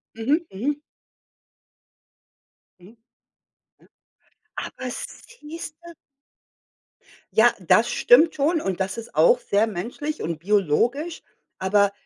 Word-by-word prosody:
Mhm, 255 +8 +1
mhm. 280 +10 -2 2.0
Mhm. 190 +6 -17 0.9
Ja, - - -23 0.7
aber 255 -1 -6
siehst 320 - -9
du 340 - -10 1.4
Ja, 235 +2 +5
das 215 +6 +3
stimmt 310 +7 +5
schon 310 +3 +1
und 190 -1 -3
das 190 +3 -2
ist 230 - -9
auch - - +5
sehr 215 - +1
menschlich 240 - -5
und 165 -1 -3
biologisch, 210 - 0 0.4
aber 200 +1 +2
235 Hz, 100 wpm, -23 LUFS, 195-300 Hz, 2.0 s, Ja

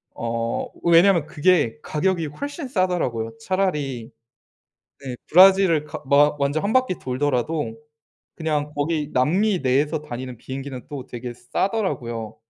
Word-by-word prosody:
어. 115 0 -2 0.2
왜냐하면 170 -1 +5
그게 150 -5 +2
가격이 170 0 0
훨씬 285 - -6
싸더라고요. 165 - -1
차라리 150 -10 -2 0.9
네. 130 -2 -5
브라질을 185 -2 +6
가 - - -8
마 145 +2 +4
완전 145 +4 0
1 205 - 0
바퀴 255 -8 +2
돌더라도 130 -1 -1 0.6
그냥 150 -2 -2
거기 150 0 -1
남미 180 +9 +2
내에서 145 +4 +1
다니는 130 -3 -7
비행기는 130 0 -7
또 140 -3 -7
되게 120 0 -6
싸더라고요. 120 - -3
150 Hz, 285 characters per minute, -23 LUFS, 125-180 Hz, 0.9 s, 브라질을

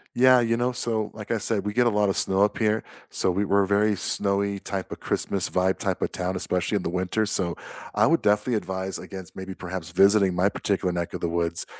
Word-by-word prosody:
Yeah, 130 0 +6
you 115 0 +1
know, 125 +1 0
so, 110 -3 -1
like 105 +1 -8
I 115 - +1
said, 105 -1 -1
we 105 - -1
get 120 +2 +2
a - - +5
lot 105 -2 +1
of - - 0
snow 95 +1 +3
up 105 - 0
here, 110 -1 +1 0.3
so 95 - +1
we 100 +3 0
we're 100 0 +3
a - - -2
very 105 +1 +2
snowy 100 +1 +1
type 95 -1 -5
of - - -6
Christmas 95 -2 0
vibe 95 +1 +1
type - - -1
of - - -1
town, 90 +1 -3
especially 90 +2 -1
in 100 - -1
the - - -2
winter, 95 +5 -1
so, 90 -4 0 0.4
I - - +4
would 165 - +2
definitely 105 +4 +1
advise 95 -2 -3
against 95 -2 -10
maybe 95 0 -7
perhaps 90 -2 -6
visiting 95 +1 +4
my 90 +3 +3
particular 100 -2 -1
neck 85 -1 -3
of - - -5
the 85 - -1
woods 85 0 -1
100 Hz, 240 wpm, -25 LUFS, 95-105 Hz, 0.4 s, Yeah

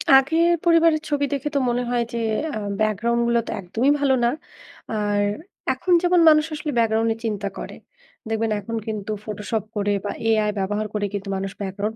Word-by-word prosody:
আগের 320 +6 +4 0.2
পরিবারের 330 -2 +4
ছবি 290 -1 +1
দেখে 280 +1 -2
তো - - +4
মনে 245 +1 0
হয় 240 -1 +1
যে, - - -2 0.4
আ - - -3 0.2
ব্যাকগ্রাউন্ডগুলা 235 +3 +1
তো - - -3
একদমই 225 +10 +1
ভালো 280 -2 +3
না। 235 - +4 0.6
আর 205 -1 0 0.5
এখন 365 - 0
যেমন 355 0 +3
মানুষ 305 0 +5
আসলে 300 0 -4
ব্যাকগ্রাউন্ড 225 -1 +2
নিয়ে 225 +1 -3
চিন্তা 205 -2 -2
করে, - - -7 0.5
দেখবেন 225 0 0
এখন 230 +4 -5
কিন্তু 215 -1 -4
ফটোশপ 210 0 -3
করে 205 0 +1
বা - - -1 0.2
AI 215 -1 +3
ব্যবহার 205 +2 -1
করে 210 -1 -1
কিন্তু 200 0 -4
মানুষ 195 0 -3
ব্যাকগ্রাউন্ড 200 +3 -3
225 Hz, 175 wpm, -23 LUFS, 210-270 Hz, 0.6 s, মানুষ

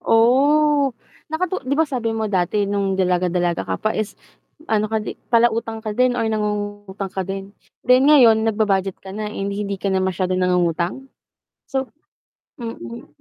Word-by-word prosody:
Oh, 280 +4 +4 0.4
nakatu 365 +4 -2
di 280 - +2
ba 320 - +4
sabi 240 -6 -2
mo 220 - -1
dati 195 +2 +1
nung 200 -1 -1
dalaga, 180 -1 +1
dalaga 175 -1 0
ka - - -1
pa 215 - -1
is 215 -1 -3 0.5
ano 215 -1 +2
ka 220 -1 -1
di - - -5 0.2
palautang 230 -1 +1
ka 215 -1 -3
din 250 +2 +2
or 225 - 0
nangungutang 205 -2 -3
ka 190 - -2
din? 195 +1 -6 0.3
Then 255 +2 +5
ngayon 230 -7 +6
nagba-budget 200 -4 +1
ka 190 - -9
na, 210 +1 -4
eh, 210 - -5
di 200 0 -3
hindi 200 0 -3
ka 195 +1 -2
na 190 - +2
masyadong 185 0 0
nangungutang? 180 +7 0 0.6
So 265 -1 -2 0.7
mm. 120 - -7
210 Hz, 170 wpm, -21 LUFS, 190-235 Hz, 0.7 s, ngayon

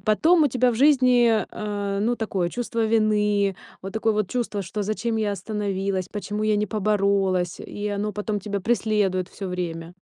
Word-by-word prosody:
потом 315 +11 +4
у - - +3
тебя 250 0 +2
в - - -3
жизни, 250 -5 +4
а, 205 -1 -3
ну, 235 +3 +1
такое 195 -6 -1
чувство 230 +2 -2
вины, 210 -2 +2 0.3
вот 195 +1 -6
такое 220 0 +1
вот 210 -2 -1
чувство, 230 -5 -2
что 200 +3 -4
зачем 225 +3 -2
я 215 -2 0
остановилась, 195 -2 -2
почему 205 +1 -4
я 215 -1 +2
не 210 +1 0
поборолась? 195 -3 +1
И 205 0 -6
оно 205 +1 -2
потом 210 +1 -3
тебя 200 0 -3
преследует 205 -4 0
всё 195 - -7
время. 170 -2 -4
210 Hz, 175 wpm, -24 LUFS, 195-220 Hz, 0.3 s, потом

